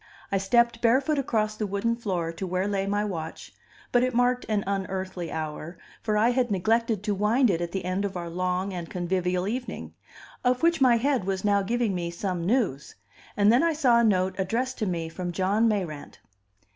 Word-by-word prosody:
I 195 - +2
stepped 235 +4 +2
barefoot 265 +6 +3
across 215 -5 0
the 215 -1 -2
wooden 200 +4 0
floor 185 -8 -2
to 185 +3 -5
where 185 +2 -1
lay 195 -1 -1
my 205 +1 0
watch, 165 -5 -6 0.4
but 245 - +4
it 255 -1 0
marked 245 +1 +2
an 210 -2 +1
unearthly 190 -2 -3
hour, 155 +1 -5 0.2
for 215 -1 0
I 220 +3 +4
had 245 -1 +1
neglected 220 +2 +1
to 210 -1 0
wind 215 +4 +3
it 170 -1 -1
at 170 0 -3
the 190 -1 -3
end 185 +2 -1
of 195 -2 -3
our 170 -1 -4
long 185 +2 -2
and 175 -2 -5
convivial 180 0 -1
evening 250 +4 -4 0.5
of 250 +3 +1
which 335 -3 +3
my 245 -3 +6
head 260 -4 +1
was 190 0 -2
now 200 -1 +3
giving 230 +1 0
me 175 -2 -2
some 175 0 -3
news. 200 - 0 0.4
And 205 +2 +5
then 245 - +5
I 335 0 +2
saw 255 -6 +4
a - - +3
note 190 -4 +2
addressed 235 +7 -1
to 215 - 0
me 170 -3 -2
from 175 +2 -5
John 195 +6 +2
Mayrant. 180 -9 -3
200 Hz, 200 wpm, -26 LUFS, 180-235 Hz, 0.5 s, my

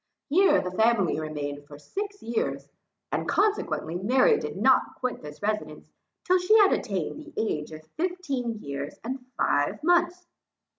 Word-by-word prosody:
Here 375 +7 +5
the 180 - -4
family 210 -4 +2
remained 145 -2 -5
for 145 - -11
six 405 - -6
years, 230 0 -2 0.4
and - - -2
consequently, 400 - 0
Mary 260 - +4
did - - -5
not - - +3
quit 255 -1 -3
this 150 +4 -10
residence, 210 0 -2 0.4
till 370 0 +3
she 370 +5 +5
had 410 -2 +6
attained 195 - -2
the 315 +1 -13
age 155 -9 -2
of 155 0 -10
fifteen 310 -10 -2
years 140 +1 -5
and 255 +2 -5
five 145 - +1
months. 350 +1 +2
235 Hz, 150 wpm, -27 LUFS, -, 0.4 s, had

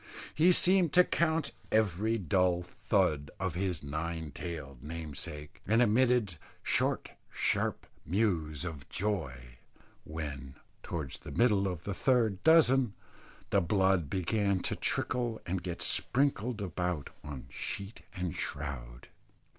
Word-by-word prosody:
He 170 +4 +5
seemed 180 -2 +4
to 180 - +8
count 160 -4 +1 0.2
every 110 +1 +2
dull 90 -1 +2
thud 90 -5 0
of 95 -3 -1
his 90 -3 -2
nine 80 +2 -4
tailed 70 -6 -7
namesake, 75 -1 -6
and 110 +3 +4
emitted 120 -5 +3 0.3
short - - +1 0.2
sharp - - 0 0.2
mews 85 -5 0
of 75 -5 -7
joy 65 - -3 0.4
when, 70 -4 -6 0.3
towards 75 -7 -5
the - - -10
middle 105 -5 +3
of 90 -3 -4
the 100 - -3
third 110 -4 +2
dozen, 135 -8 +5 0.6
the 100 - +4
blood 95 -3 +2
began 100 +2 +1
to - - -1
trickle 120 -3 0
and 90 +1 -2
get 85 -1 -4
sprinkled 125 -5 +1
about 90 -5 -2
on 75 -3 -7
sheet 100 +2 -4
and 90 -3 -3
shroud. 65 -5 -5
90 Hz, 125 wpm, -31 LUFS, 75-110 Hz, 0.6 s, to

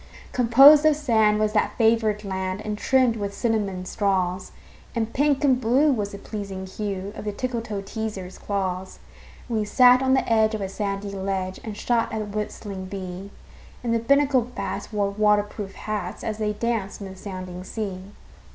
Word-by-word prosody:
Composed 270 +5 +7
of 310 -1 +5
sand 220 -8 +3
was 215 0 +1
that 210 - 0
favored 220 -2 +2
land, 190 0 -3
And 210 -1 -2
trimmed 250 +1 +2
with 200 -1 -4
cinnamon 205 -6 -1
straws; 185 -2 -1 0.4
And 230 -1 -1
pink 285 0 +2
and 260 -3 +3
blue 260 +6 +4
was 205 -4 -2
the 200 - -7
pleasing 200 -2 -6
hue 200 0 -5
Of - - -7
the 210 - -2
Tickletoeteaser's 215 -4 -4
claws. 190 -2 -3 0.5
And 230 -3 -1
we - - +1
sat 250 +4 +6
on 265 0 +3
the 265 - 0
edge 220 -1 +3
of 215 - -4
a 195 - -3
sandy 200 0 -3
ledge 190 -1 -3
And 215 -2 -6
shot 235 0 0
at 220 - -3
the - - -10
whistling 200 -2 -6
bee; 185 0 -7 0.5
And 235 -1 0
the 230 - +2
Binnacle 275 +2 +3
bats 240 0 -5
wore 205 -2 0
water 210 0 +3
proof 205 -1 -8
hats 205 -4 -4
As 220 -1 -3
they 210 -1 0
danced 225 -2 -2
in 200 - -6
the 190 - -9
sounding 185 -2 -7
sea. 195 -2 -5
210 Hz, 180 wpm, -24 LUFS, 195-230 Hz, 0.5 s, Composed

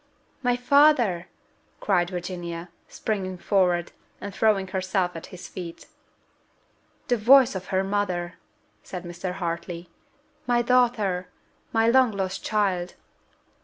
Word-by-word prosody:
"My 245 -1 +2
father!" 245 - +4 0.5
cried 175 -4 +1
Virginia, 175 -1 -5 0.2
springing 190 -4 -3
forward, 180 -3 +1 0.3
and 200 0 -7
throwing 195 -2 +2
herself 185 -1 -1
at 165 - -7
his 185 - -10
feet. 170 -3 -8 1.2
"The 245 - +2
voice 255 +3 +6
of 185 -1 -6
her 190 -1 +1
mother!" 185 -3 -2 0.4
said 180 -1 -7
Mr. 175 +1 -5
Hartley. 170 -1 -5 0.6
"My 240 -1 +3
daughter! 230 -7 +2 0.4
My 225 0 +3
long 255 +1 +5
lost 190 -1 -3
child!" 190 -4 0
190 Hz, 115 wpm, -25 LUFS, 175-220 Hz, 1.2 s, voice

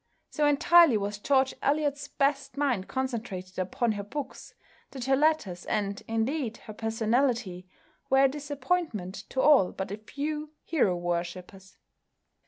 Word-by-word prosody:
So 300 -1 +2
entirely 330 -2 +6
was 205 0 -3
George 265 +3 +2
Eliot's 285 0 0
best 280 0 -1
mind 260 -10 0
concentrated 225 -8 -4
upon 205 +6 0
her 205 -1 -3
books 280 +8 -7 0.3
that 260 -3 -6
her 270 0 +3
letters, 275 - +1
and 200 -1 -1
indeed 225 +2 -1
her 215 - -8
personality, 225 -3 0 0.4
were 270 0 +5
a - - +7
disappointment 280 - -2 0.2
to 260 - 0
all 285 -11 +5
but 190 0 -5
a 205 - -4
few 300 +7 -5
hero 250 - +1
worshippers. 175 +2 -5
245 Hz, 135 wpm, -28 LUFS, 200-285 Hz, 0.4 s, a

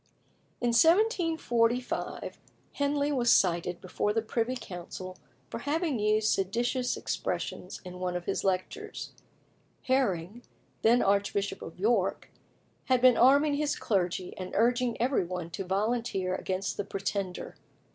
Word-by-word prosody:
In 245 - +1
1745 320 - +2 0.4
Henley 285 0 0
was 245 -4 +3
cited 175 -1 +2
before 195 +3 -1
the 225 0 0
Privy 230 +3 -1
Council 185 -3 -7 0.4
for - - -4
having 300 -3 -1
used 215 +1 +2
seditious 240 +6 0
expressions - - -4
in 180 0 -8
one 180 -1 -2
of 175 -1 -4
his 195 - -1
lectures. 195 - -3 0.7
Herring, 235 -5 0 0.4
then 235 +2 +4
Archbishop 200 0 0
of 165 - -9
York, 205 -2 +1 0.5
had 255 -1 +3
been 250 -1 +6
arming 285 +5 +5
his 295 0 0
clergy, 180 -3 -1
and 185 0 -6
urging 240 +2 +2
every 250 -2 +2
one 175 -1 -5
to 195 - -4
volunteer 195 -1 -1
against 190 +1 -2
the 205 - -1
Pretender. 195 -1 -4
220 Hz, 125 wpm, -29 LUFS, 185-255 Hz, 0.7 s, been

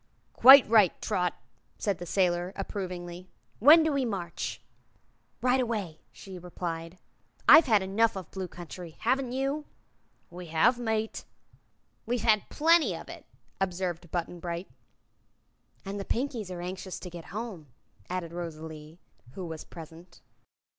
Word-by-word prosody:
"Quite 270 +2 +9
right, 215 -5 +4
Trot," 180 -1 -1 0.4
said 200 -5 -1
the 175 - -7
sailor, 180 0 +1
approvingly. 180 -2 -6 0.3
"When 310 +7 +8
do 315 - +1
we 275 -1 +1
march?" 190 -8 -4 0.8
"Right 255 +1 +3
away," 205 -10 -3
she 190 -2 -10
replied. 170 -1 -6 0.5
"I've 320 - +9
had 215 -5 +4
enough 220 +4 +2
of 190 - -6
the - - -34
Blue 190 -1 -4
Country. 175 -1 -10
Haven't 255 +2 +1
you?" 275 +3 -2 0.7
"We 175 0 -9
have, 165 +10 +3
mate." 220 -2 -2 0.8
"We've 240 -1 -1
had 215 -3 +3
plenty 330 +2 +3
of - - -10
it," - - -10 0.3
observed 180 -2 -2
Button 175 0 -4
Bright. 170 +2 -5 1.2
"And 200 +1 -4
the - - -3
Pinkies 235 -3 -3
are 180 -1 -6
anxious 185 +1 -6
to 180 - -9
get 170 -1 -9
home," 205 -7 -7 0.4
added 175 -2 -4
Rosalie, 160 -2 -7 0.4
who 185 - -6
was 160 -2 -7
present. 165 +1 -13
185 Hz, 140 wpm, -28 LUFS, 175-225 Hz, 1.2 s, Quite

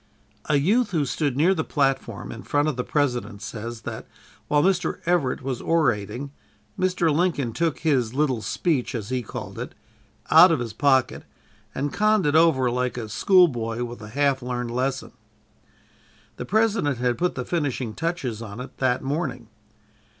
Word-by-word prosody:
A 150 - +1
youth 205 - +2
who 160 -6 0
stood 140 -1 -1
near 170 +6 +4
the 160 -4 -1
platform 135 - -1
in 115 - -8
front 145 +1 0
of 155 - -1
the 125 - -2
President 120 -8 -1
says 115 +1 -6
that, - - -7 0.4
while 145 0 +3
Mr. 190 0 +1
Everett 165 -8 +1
was 130 -2 -3
orating, 140 - 0 0.4
Mr. 180 -4 +1
Lincoln 155 -9 0
took 165 +1 0
his 130 -7 +1
"little 135 -5 +1
speech," 135 - -1
as 110 -2 -4
he 130 -1 -1
called 115 - -7
it, - - -6 0.6
out - - +9
of - - +1
his 115 -3 -4
pocket, 130 0 +2 0.5
and 145 +1 -2
conned 215 -3 +2
it 145 +1 +2
over 150 -7 +4
like 125 0 -1
a 110 -3 -5
schoolboy 120 - +3
with 120 -1 -7
a 105 - -9
half 140 +1 +1
learned 125 -1 -3
lesson. 130 +2 -2 1.3
The - - -5
President 205 - +1
had 125 0 0
put 180 +1 0
the 125 - -4
finishing 135 -9 -2
touches 140 -8 -3
on 110 0 -8
it 125 - -8
that 130 -1 +1
morning. 135 -5 -3
135 Hz, 165 wpm, -24 LUFS, 120-160 Hz, 1.3 s, out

